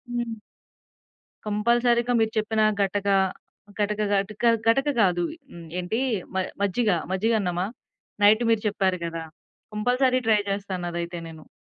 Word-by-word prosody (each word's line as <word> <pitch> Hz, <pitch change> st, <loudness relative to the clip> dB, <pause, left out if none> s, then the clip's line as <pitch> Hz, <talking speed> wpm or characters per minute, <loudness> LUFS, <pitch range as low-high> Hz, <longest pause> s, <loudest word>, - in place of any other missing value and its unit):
హ్మ్. 235 Hz, -2 st, -3 dB, 1.1 s
కంపల్సరీగా 235 Hz, +3 st, +2 dB
మీరు 220 Hz, 0 st, +2 dB
చెప్పిన 215 Hz, 0 st, +1 dB, 0.2 s
గటక 200 Hz, +1 st, 0 dB, 0.7 s
గటక, 210 Hz, 0 st, 0 dB
గటక 200 Hz, +2 st, -1 dB, 0.2 s
గటక 270 Hz, +5 st, +3 dB
గాదు. 175 Hz, -4 st, +3 dB, 0.3 s
హ్మ్. 170 Hz, -1 st, -10 dB
ఏంటీ 180 Hz, +6 st, -2 dB, 0.4 s
మ -, -, 0 dB, 0.2 s
మజ్జిగ, 205 Hz, +3 st, +1 dB, 0.2 s
మజ్జిగన్నమా? 190 Hz, -3 st, 0 dB, 0.6 s
నైట్ 215 Hz, +3 st, +6 dB
మీరు 225 Hz, -, +2 dB
చెప్పారు 190 Hz, -3 st, 0 dB
గదా! 165 Hz, -1 st, -4 dB, 0.5 s
కంపల్సరీ 250 Hz, +4 st, +2 dB
ట్రై 215 Hz, -2 st, +4 dB
జేస్తానదైతే 175 Hz, -3 st, -3 dB
నేను. 160 Hz, -1 st, -13 dB
210 Hz, 115 wpm, -25 LUFS, 185-225 Hz, 1.1 s, నైట్